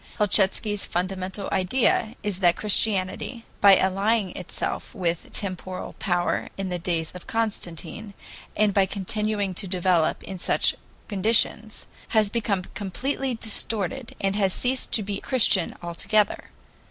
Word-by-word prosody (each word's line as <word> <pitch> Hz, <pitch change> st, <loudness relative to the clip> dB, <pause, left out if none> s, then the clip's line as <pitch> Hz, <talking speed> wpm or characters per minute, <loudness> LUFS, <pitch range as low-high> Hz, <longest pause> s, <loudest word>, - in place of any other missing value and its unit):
Helchitsky's 205 Hz, 0 st, +2 dB
fundamental 185 Hz, +2 st, -2 dB
idea 220 Hz, +3 st, +2 dB
is 205 Hz, -3 st, -1 dB
that 175 Hz, -2 st, +4 dB
Christianity, 210 Hz, +2 st, 0 dB
by 200 Hz, -1 st, +8 dB
allying 195 Hz, +1 st, +1 dB
itself -, -, -5 dB
with 170 Hz, -4 st, -2 dB
temporal 185 Hz, -1 st, -5 dB
power 175 Hz, -2 st, 0 dB
in 195 Hz, -1 st, -3 dB
the 180 Hz, -1 st, -2 dB
days 165 Hz, -2 st, -1 dB
of 180 Hz, -, -11 dB
Constantine, 205 Hz, -2 st, -3 dB, 0.4 s
and 210 Hz, -1 st, +3 dB
by 195 Hz, -1 st, +4 dB
continuing 205 Hz, 0 st, -1 dB
to 195 Hz, +2 st, -4 dB
develop 180 Hz, -3 st, +1 dB
in 190 Hz, -2 st, -7 dB
such -, -, +2 dB, 0.3 s
conditions, 215 Hz, +1 st, +1 dB, 0.3 s
has 210 Hz, -2 st, +4 dB
become 205 Hz, -5 st, 0 dB
completely 255 Hz, +6 st, -2 dB
distorted, 225 Hz, +2 st, -2 dB
and 195 Hz, 0 st, 0 dB
has 195 Hz, -3 st, +1 dB
ceased 255 Hz, +1 st, 0 dB
to 215 Hz, -, +3 dB
be 200 Hz, 0 st, -3 dB
Christian 210 Hz, -8 st, +2 dB
altogether. 200 Hz, +5 st, +1 dB
200 Hz, 130 wpm, -25 LUFS, 185-215 Hz, 0.4 s, by